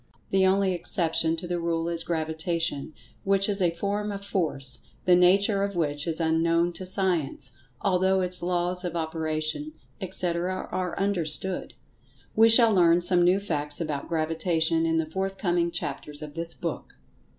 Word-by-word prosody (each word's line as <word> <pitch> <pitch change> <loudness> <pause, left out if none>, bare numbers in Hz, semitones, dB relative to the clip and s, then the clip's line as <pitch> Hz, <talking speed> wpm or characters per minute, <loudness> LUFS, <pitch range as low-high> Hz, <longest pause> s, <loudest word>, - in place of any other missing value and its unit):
The 190 -1 +4
only 190 0 +2
exception 165 -2 +1
to 175 - -7
the 175 0 -2
rule 165 -1 -1
is 170 -1 0
Gravitation, 160 -2 -2 0.3
which 195 0 +2
is 200 -1 0
a 175 - +4
form 205 +5 -3
of 200 0 -7
Force, 140 - -2 0.3
the 180 - +6
nature 195 +3 +4
of 200 -1 -2
which 150 -2 -2
is 165 0 -1
unknown 165 +1 +1
to 185 +1 -4
Science, 175 -9 -1 0.3
although 190 0 +2
its 180 0 -1
laws 180 +1 -1
of 175 -2 -4
operation, 160 - -3 0.3
etc., 180 0 -1
are 185 -2 -3
understood. 190 -2 0 0.6
We 225 +1 +6
shall 225 -1 +7
learn 175 -2 +4
some 175 0 +6
new 180 +3 +4
facts 150 -7 -3
about 155 -4 -4
Gravitation 165 0 0
in 165 0 +1
the 160 - +1
forthcoming 180 0 -1
chapters 150 -2 -5
of 150 -1 -8
this 165 +1 -3
book. - - -6
175 Hz, 155 wpm, -26 LUFS, 160-190 Hz, 0.6 s, shall